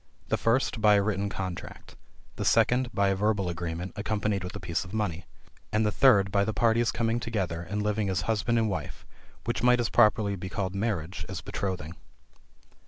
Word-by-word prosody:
The -, -, +2 dB
first 115 Hz, 0 st, +1 dB
by 105 Hz, -1 st, +6 dB
a 100 Hz, -, +4 dB
written 100 Hz, -1 st, -1 dB
contract. 95 Hz, -3 st, -7 dB, 0.4 s
The -, -, -3 dB
second, 125 Hz, 0 st, +3 dB
by 100 Hz, -1 st, +2 dB
a 95 Hz, -, +1 dB
verbal 100 Hz, -2 st, 0 dB
agreement, 85 Hz, +1 st, -4 dB
accompanied 105 Hz, -1 st, -1 dB
with 90 Hz, +2 st, -6 dB
a -, -, -5 dB
piece 85 Hz, -4 st, -2 dB
of 95 Hz, +3 st, -8 dB
money. 90 Hz, -6 st, -2 dB, 0.5 s
And 110 Hz, 0 st, +2 dB
the 105 Hz, -, +2 dB
third, 100 Hz, -6 st, +4 dB
by 100 Hz, 0 st, +3 dB
the 110 Hz, 0 st, -2 dB
parties 115 Hz, 0 st, +3 dB
coming 115 Hz, +1 st, 0 dB
together, 100 Hz, -9 st, -2 dB
and 100 Hz, +5 st, -3 dB
living 105 Hz, -1 st, 0 dB
as 90 Hz, -1 st, 0 dB
husband 115 Hz, +3 st, 0 dB
and 115 Hz, -1 st, +2 dB
wife; 100 Hz, -, -5 dB, 0.4 s
which 120 Hz, -1 st, -2 dB
might 125 Hz, +1 st, +4 dB
as 120 Hz, -, 0 dB
properly 105 Hz, -3 st, +3 dB
be 95 Hz, 0 st, -6 dB
called 95 Hz, -1 st, -3 dB
marriage 100 Hz, -4 st, -2 dB
as -, -, -5 dB
betrothing. 90 Hz, -5 st, -4 dB
100 Hz, 190 wpm, -28 LUFS, 95-110 Hz, 0.5 s, by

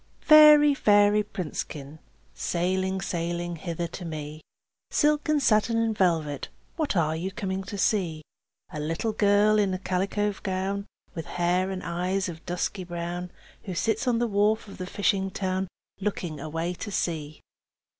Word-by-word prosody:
Fairy, 300 Hz, -1 st, +8 dB
fairy 205 Hz, -4 st, +4 dB
princekin, 155 Hz, -6 st, -6 dB, 0.3 s
Sailing, 185 Hz, -, -1 dB
sailing 175 Hz, -1 st, -3 dB
hither 170 Hz, +1 st, -3 dB
to 175 Hz, +2 st, -7 dB
me, 155 Hz, -2 st, -6 dB, 0.5 s
Silk 300 Hz, 0 st, +2 dB
and 305 Hz, -1 st, +3 dB
satin 230 Hz, -2 st, +3 dB
and 225 Hz, -1 st, +1 dB
velvet, 160 Hz, -7 st, 0 dB, 0.3 s
What 310 Hz, -, -1 dB
are 160 Hz, -2 st, +2 dB
you 180 Hz, +4 st, -3 dB
coming 195 Hz, -2 st, -3 dB
to 200 Hz, +1 st, -6 dB
see? 175 Hz, -7 st, 0 dB, 0.5 s
A 150 Hz, -, -4 dB
little 165 Hz, +9 st, -2 dB
girl 210 Hz, 0 st, +4 dB
in 195 Hz, -2 st, +1 dB
a -, -, -2 dB
calico 195 Hz, +3 st, -1 dB
gown, 195 Hz, +1 st, -2 dB, 0.3 s
With 165 Hz, -1 st, -6 dB
hair 180 Hz, +2 st, +1 dB
and 190 Hz, -1 st, -4 dB
eyes 180 Hz, +3 st, -1 dB
of 165 Hz, -1 st, -9 dB
dusky 180 Hz, +2 st, -2 dB
brown, 175 Hz, +1 st, -5 dB, 0.4 s
Who 185 Hz, -3 st, -5 dB
sits 225 Hz, +7 st, 0 dB
on 240 Hz, -2 st, +3 dB
the 240 Hz, -, +1 dB
wharf 215 Hz, +1 st, +1 dB
of 195 Hz, -, -11 dB
the 180 Hz, -, -4 dB
fishing 195 Hz, -1 st, 0 dB
town. 190 Hz, 0 st, -2 dB, 0.3 s
Looking 180 Hz, -6 st, -3 dB
away 165 Hz, +4 st, -3 dB
to 195 Hz, +4 st, -6 dB
sea. 155 Hz, -6 st, -3 dB
190 Hz, 155 wpm, -26 LUFS, 170-205 Hz, 0.5 s, Fairy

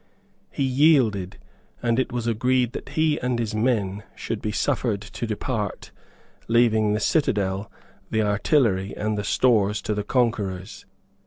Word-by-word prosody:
He 140 Hz, -, -2 dB
yielded, 130 Hz, -, +3 dB, 0.5 s
and 120 Hz, 0 st, +2 dB
it 130 Hz, -, -1 dB
was 120 Hz, -1 st, -3 dB
agreed 125 Hz, +2 st, +1 dB
that -, -, -7 dB
he 155 Hz, -1 st, +1 dB
and 125 Hz, -1 st, -1 dB
his 115 Hz, -2 st, -2 dB
men 105 Hz, -3 st, 0 dB
should 115 Hz, -, -4 dB
be 105 Hz, -, -2 dB
suffered 115 Hz, -3 st, 0 dB
to 100 Hz, +3 st, -6 dB
depart, 110 Hz, -1 st, -3 dB, 0.6 s
leaving 110 Hz, -2 st, +3 dB
the 105 Hz, -, 0 dB
citadel, 100 Hz, -, 0 dB, 0.4 s
the 110 Hz, 0 st, +1 dB
artillery, 105 Hz, -2 st, +1 dB
and 110 Hz, 0 st, -1 dB
the 105 Hz, -, -2 dB
stores 105 Hz, -2 st, +2 dB
to 105 Hz, -, -1 dB
the 105 Hz, 0 st, -2 dB
conquerors. 105 Hz, -6 st, -1 dB
110 Hz, 145 wpm, -24 LUFS, 105-125 Hz, 0.6 s, yielded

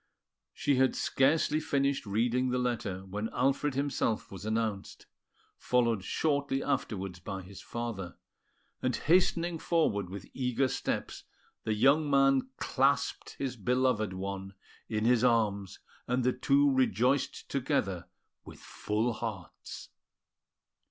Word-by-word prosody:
She 140 Hz, -2 st, 0 dB
had 130 Hz, 0 st, +3 dB
scarcely 150 Hz, +2 st, +2 dB
finished 140 Hz, -5 st, 0 dB
reading 120 Hz, +5 st, +1 dB
the 125 Hz, -, 0 dB
letter 110 Hz, -7 st, -2 dB
when 105 Hz, +3 st, -4 dB
Alfred 135 Hz, +2 st, 0 dB
himself 140 Hz, -5 st, -1 dB
was 95 Hz, +1 st, -8 dB
announced, 110 Hz, -3 st, -2 dB, 0.5 s
followed 115 Hz, -5 st, +1 dB
shortly 140 Hz, +1 st, 0 dB
afterwards 95 Hz, -10 st, -2 dB
by 95 Hz, +1 st, -6 dB
his 95 Hz, +1 st, -11 dB
father; 115 Hz, -7 st, -5 dB, 0.6 s
and 130 Hz, -1 st, 0 dB
hastening 170 Hz, 0 st, +2 dB
forward 105 Hz, -, +1 dB
with 95 Hz, 0 st, -7 dB
eager 130 Hz, 0 st, +1 dB
steps, -, -, -3 dB, 0.4 s
the 110 Hz, -, 0 dB
young 140 Hz, +7 st, +4 dB
man 135 Hz, -1 st, +4 dB
clasped -, -, 0 dB
his 135 Hz, -2 st, -3 dB
beloved 125 Hz, -2 st, +1 dB
one 95 Hz, +1 st, -5 dB, 0.3 s
in 110 Hz, 0 st, -1 dB
his 120 Hz, 0 st, +4 dB
arms, 105 Hz, -5 st, +1 dB, 0.3 s
and 125 Hz, +1 st, +1 dB
the 125 Hz, +1 st, +2 dB
two 140 Hz, 0 st, +3 dB
rejoiced 130 Hz, +1 st, +1 dB
together 125 Hz, -, -1 dB, 0.4 s
with -, -, -12 dB
full 110 Hz, +3 st, -2 dB
hearts. 110 Hz, -5 st, -7 dB
125 Hz, 120 wpm, -30 LUFS, 105-135 Hz, 0.6 s, young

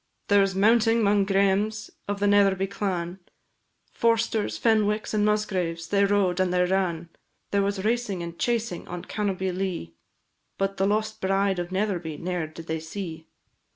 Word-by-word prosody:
There 205 Hz, -1 st, +6 dB
was 195 Hz, -1 st, +1 dB
mounting 225 Hz, +3 st, +4 dB
'mong 200 Hz, -1 st, +3 dB
Græmes 200 Hz, +2 st, +1 dB, 0.2 s
of 200 Hz, 0 st, -2 dB
the 205 Hz, -, +1 dB
Netherby 200 Hz, -2 st, +4 dB
clan; 185 Hz, -2 st, -3 dB, 0.7 s
Forsters, 230 Hz, -2 st, +1 dB
Fenwicks, 215 Hz, -2 st, +1 dB
and 210 Hz, -1 st, +2 dB
Musgraves, 185 Hz, -6 st, -1 dB
they 200 Hz, 0 st, +3 dB
rode 195 Hz, -3 st, +2 dB
and 185 Hz, -1 st, +2 dB
they 180 Hz, 0 st, +3 dB
ran: 180 Hz, -3 st, -1 dB, 0.4 s
There 200 Hz, -, +2 dB
was 200 Hz, 0 st, -1 dB
racing, 220 Hz, -6 st, 0 dB
and 170 Hz, 0 st, -8 dB
chasing, 230 Hz, -7 st, -1 dB
on 175 Hz, 0 st, -6 dB
Cannobie 190 Hz, -3 st, -2 dB
Lea, 180 Hz, -, -3 dB, 0.6 s
But 195 Hz, 0 st, -1 dB
the 195 Hz, -, +2 dB
lost 215 Hz, +1 st, -1 dB
bride 195 Hz, 0 st, +1 dB
of 175 Hz, 0 st, -4 dB
Netherby 185 Hz, -6 st, -2 dB
ne'er 175 Hz, -1 st, -3 dB
did 160 Hz, +1 st, -11 dB
they 160 Hz, 0 st, -2 dB
see. 160 Hz, -1 st, -7 dB
195 Hz, 155 wpm, -26 LUFS, 180-210 Hz, 0.7 s, There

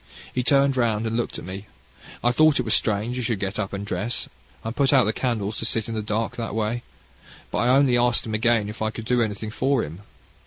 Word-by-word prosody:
He 125 Hz, -, 0 dB
turned 135 Hz, +1 st, +3 dB
round 115 Hz, -3 st, +1 dB
and 110 Hz, 0 st, -1 dB
looked 120 Hz, -, -2 dB
at -, -, -8 dB
me. 95 Hz, +3 st, -7 dB, 0.6 s
I 120 Hz, -, +4 dB
thought 155 Hz, +2 st, +4 dB
it 125 Hz, -, -1 dB
strange 110 Hz, +3 st, +1 dB
he -, -, -1 dB
should 115 Hz, -4 st, -1 dB
get 100 Hz, +1 st, -3 dB
up 100 Hz, -2 st, -2 dB
and 100 Hz, 0 st, -4 dB
dress, 100 Hz, +4 st, -2 dB, 0.4 s
and 115 Hz, +1 st, -4 dB
put 140 Hz, 0 st, +3 dB
out 135 Hz, -3 st, +6 dB
the 110 Hz, -, 0 dB
candles 110 Hz, -4 st, -2 dB
to -, -, -2 dB
sit 110 Hz, -1 st, 0 dB
in 115 Hz, -, -4 dB
the 110 Hz, -, -2 dB
dark, 105 Hz, +2 st, -2 dB
that 115 Hz, -3 st, -4 dB
way. 110 Hz, +2 st, -1 dB, 0.7 s
But -, -, -1 dB
I 120 Hz, -, +2 dB
only 130 Hz, -1 st, +4 dB
asked 120 Hz, 0 st, +2 dB
him 110 Hz, -, -4 dB
again 110 Hz, -1 st, +2 dB
if 105 Hz, +2 st, -8 dB
I 110 Hz, -, +1 dB
could 110 Hz, 0 st, -7 dB
do 125 Hz, +1 st, +2 dB
anything 110 Hz, -1 st, -2 dB
for 130 Hz, +1 st, +1 dB
him. 80 Hz, +6 st, -8 dB
115 Hz, 240 wpm, -24 LUFS, 105-125 Hz, 0.7 s, out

